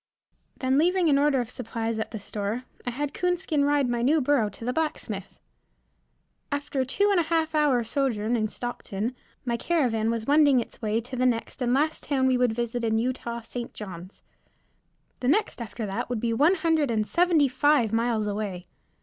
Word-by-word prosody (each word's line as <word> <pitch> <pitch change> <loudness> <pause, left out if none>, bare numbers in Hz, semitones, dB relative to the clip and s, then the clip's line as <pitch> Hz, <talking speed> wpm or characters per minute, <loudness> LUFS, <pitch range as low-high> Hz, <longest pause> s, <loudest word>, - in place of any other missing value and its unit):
Then 260 +1 +2
leaving 355 +1 +3
an 280 -1 +4
order 280 -4 +2
for 230 - -13
supplies 230 -2 -3
at 220 - -3
the 220 - -6
store, 205 +3 -4 0.2
I - - +2
had 285 +3 -3
Coonskin 350 -5 0
ride 285 -2 +2
my 240 -1 -1
new 290 +6 +3
burro 255 -6 +2
to 225 - -10
the 250 - 0
blacksmith. 320 +1 -3 1.1
After 285 -1 -2
a 260 - +1
two 405 +9 +2
and 390 - +4
a - - +3
half 325 -1 +1
hour 290 -6 +3
sojourn 235 -2 0
in 215 -2 +1
Stockton, 235 0 -4 0.3
my 235 -1 0
caravan 235 -9 +1
was 230 -1 -2
wending 285 -2 +5
its 235 - -7
way 220 +1 0
to 250 +3 -8
the 255 0 +2
next 235 +1 -2
and 245 -1 +1
last 310 +3 +1
town 270 -3 0
we 260 -1 +3
would 250 -2 +2
visit 240 +1 -2
in 220 -1 +1
Utah, 235 0 -2
St. 235 +1 -7
Johns. 185 -2 -9 1.0
The 250 - -2
next 340 - +1
after 225 0 -5
that 195 +3 -3
would 245 -2 -1
be 230 +1 0
one 300 +11 +4
hundred 320 -4 +1
and 215 -2 +1
seventy 340 0 +3
five 260 -3 +2
miles 225 -1 +1
away. 200 -3 -3
250 Hz, 190 wpm, -26 LUFS, 225-290 Hz, 1.1 s, wending